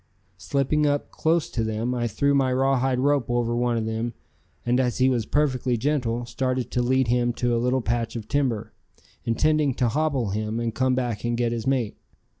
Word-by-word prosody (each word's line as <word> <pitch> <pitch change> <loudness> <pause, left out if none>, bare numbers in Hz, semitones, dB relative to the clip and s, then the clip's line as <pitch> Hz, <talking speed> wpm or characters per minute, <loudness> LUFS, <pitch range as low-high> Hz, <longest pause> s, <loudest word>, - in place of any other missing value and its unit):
Slipping 145 +2 +1
up 145 0 -1
close 165 0 +1
to 115 - -1
them 110 +3 -1
I 120 -1 -1
threw 140 +6 +1
my 135 -2 +2
rawhide 130 0 +2
rope 140 -2 +1
over 120 -1 0
one 120 0 +1
of 110 - -1
them, 110 +1 -3 0.5
and, 120 +1 +2
as 125 -3 0
he 130 0 +4
was 120 -4 0
perfectly 130 -4 +1
gentle, 120 -3 -1
started 130 +1 -2
to 125 - +1
lead 130 0 +2
him 120 0 +2
to 120 0 0
a 115 - 0
little 125 +1 +1
patch 115 0 -1
of 110 -2 -5
timber, 130 -7 -1 0.5
intending 150 +3 +2
to 125 - +1
hobble 140 -5 0
him 110 +2 -2
and 115 -1 -2
come 130 +1 +1
back 120 -5 -2
and 120 0 -1
get 120 -1 +1
his 115 +1 -3
mate. 125 -6 0
125 Hz, 200 wpm, -25 LUFS, 115-135 Hz, 0.5 s, he